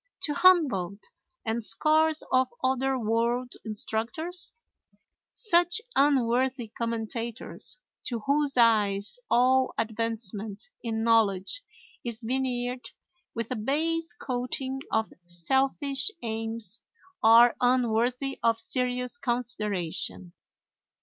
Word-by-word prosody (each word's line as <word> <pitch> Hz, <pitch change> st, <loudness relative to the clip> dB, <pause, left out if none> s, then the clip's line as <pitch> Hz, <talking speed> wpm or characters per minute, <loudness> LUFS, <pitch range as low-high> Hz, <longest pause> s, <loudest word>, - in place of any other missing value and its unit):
to 295 Hz, -, -1 dB
Humboldt 265 Hz, -, +3 dB, 0.3 s
and 225 Hz, +1 st, -1 dB
scores 310 Hz, +5 st, +2 dB
of 255 Hz, 0 st, +4 dB, 0.2 s
other 265 Hz, +1 st, +1 dB
world 235 Hz, +2 st, 0 dB
instructors? 235 Hz, -, -3 dB, 0.8 s
Such 350 Hz, -4 st, +2 dB, 0.2 s
unworthy 255 Hz, -3 st, +2 dB
commentators, 230 Hz, -, -4 dB, 0.3 s
to 235 Hz, -3 st, -3 dB
whose 280 Hz, +2 st, +1 dB
eyes 215 Hz, -, +3 dB
all 255 Hz, +1 st, +3 dB
advancement 220 Hz, -2 st, -3 dB, 0.2 s
in 225 Hz, -1 st, -2 dB
knowledge 225 Hz, -, +2 dB, 0.4 s
is 235 Hz, -1 st, -4 dB
veneered 250 Hz, -1 st, -2 dB, 0.5 s
with 230 Hz, 0 st, -4 dB
a -, -, 0 dB
base 320 Hz, +8 st, -1 dB
coating 260 Hz, +1 st, -3 dB
of 220 Hz, 0 st, 0 dB
selfish 265 Hz, -, +1 dB
aims, 225 Hz, -1 st, -3 dB, 0.4 s
are 230 Hz, +2 st, +7 dB
unworthy 250 Hz, +2 st, +1 dB
of 230 Hz, -1 st, +2 dB
serious 250 Hz, +5 st, -1 dB
consideration. 210 Hz, -, -2 dB
240 Hz, 90 wpm, -27 LUFS, 225-265 Hz, 0.8 s, are